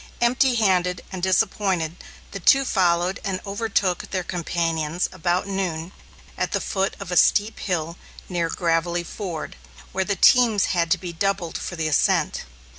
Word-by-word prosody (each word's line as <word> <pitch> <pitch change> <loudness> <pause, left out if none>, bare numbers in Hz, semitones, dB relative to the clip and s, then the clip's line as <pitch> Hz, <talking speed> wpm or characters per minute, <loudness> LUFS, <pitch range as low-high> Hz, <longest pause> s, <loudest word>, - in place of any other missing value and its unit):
Empty 245 +2 +3
handed 180 -5 +1
and 185 -2 -5
disappointed, 185 -3 +1 0.4
the 200 - -6
two 275 +9 +5
followed 180 -3 +1
and 195 -3 -2
overtook 200 -3 -1
their 185 -2 -2
companions 165 -2 -1
about 180 0 -1
noon, 185 -4 -3 0.5
at - - -1
the - - +1
foot 195 -1 -1
of 200 -3 -7
a - - -1
steep 210 +4 +3
hill 170 -3 -2 0.3
near 170 -2 -1
"Gravelly 170 +1 0
Ford," 175 - -6 0.3
where 190 - 0
the 200 +1 -1
teams 230 -3 +5
had 170 -2 +1
to - - +3
be 180 -2 -7
doubled 190 -1 -1
for 175 - -4
the 160 -2 -1
ascent. 155 - +1
180 Hz, 155 wpm, -23 LUFS, 170-200 Hz, 0.5 s, two